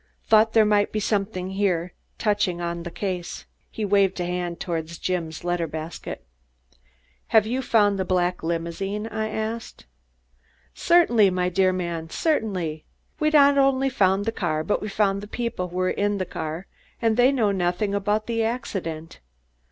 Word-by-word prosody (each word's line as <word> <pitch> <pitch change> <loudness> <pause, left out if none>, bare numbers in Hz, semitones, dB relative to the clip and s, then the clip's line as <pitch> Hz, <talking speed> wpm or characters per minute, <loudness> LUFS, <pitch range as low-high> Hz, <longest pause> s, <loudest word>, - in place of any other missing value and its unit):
Thought 220 0 +4
there 220 -1 +6
might 205 -1 +2
be 215 - -1
something 195 -3 -1
here 180 -3 0 0.2
touching 205 -5 0
on 170 0 -3
the 175 - -6
case." 180 -1 -4 0.2
He 215 - -4
waved 195 -2 +2
a 175 - -1
hand 175 -1 -3
toward 165 -3 -3
Jim's 170 -1 -4
letter 175 -1 -1
basket. 155 - -7 1.0
"Have 220 -2 +4
you 250 +4 -1
found 205 -5 +3
the - - +1
black 180 -1 0
limousine?" 170 +5 -3
I 220 -1 -3
asked. 220 +1 -5 0.9
"Certainly, 240 - +4
my 180 -1 0
dear 185 +1 +3
man, 170 -3 -3
certainly! 185 - -1 0.4
We've 305 0 +1
not 285 -1 +6
only 270 0 +3
found 195 -2 +2
the 225 - 0
car, 155 -7 -1
but 205 - 0
we 210 - -4
found 200 -1 +1
the 205 - -8
people 235 -5 -3
who 175 - -11
were 185 0 +1
in 205 0 0
the 185 - -2
car 160 +2 -5 0.3
and 225 -2 +2
they 245 +3 +5
know 230 -7 +2
nothing 185 +2 0
about 205 +2 0
the 230 -1 0
accident. 185 -9 -4
195 Hz, 165 wpm, -24 LUFS, 175-220 Hz, 1.0 s, there